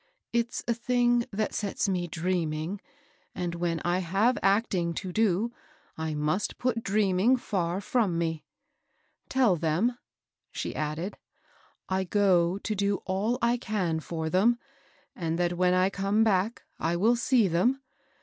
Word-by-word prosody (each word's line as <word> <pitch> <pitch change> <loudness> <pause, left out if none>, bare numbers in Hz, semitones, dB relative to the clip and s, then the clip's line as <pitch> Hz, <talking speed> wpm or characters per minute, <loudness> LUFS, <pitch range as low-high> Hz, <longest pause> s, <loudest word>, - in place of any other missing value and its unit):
It's 235 0 -1
a 235 - +3
thing 240 0 +2
that 215 +1 -2
sets 205 0 -1
me 180 -2 -1
dreaming; 170 +1 -2 0.5
and 175 -1 -2
when 170 -1 -1
I 175 +1 +2
have 195 +8 +2
act 200 +4 +2
ing 170 -2 0
to 185 - -4
do, 220 +2 +1 0.4
I 160 -1 -3
must 150 +7 -1
put 245 -2 0
dreaming 205 +3 +2
fiur 180 -7 -1
firom 215 -3 +1
me. 165 -2 -2 0.9
Tell 250 -8 +3
them," 175 +11 0 0.5
she - - -4
added, 155 +6 -3 0.7
"I 190 0 0
go 185 -2 +3
to 215 +2 -3
do 200 0 0
all 205 +6 0
I 235 +1 +3
can 195 -9 -1
for 160 0 -4
them, 200 +8 +3 0.6
and 165 -2 -2
that 175 0 +1
when 180 +1 +2
I 185 +1 +3
come 200 +3 +1
back 210 +1 +1 0.2
I 165 +2 0
will 220 +7 +3
see 235 -2 +3
them. 215 +11 +2
190 Hz, 150 wpm, -28 LUFS, 170-225 Hz, 0.9 s, a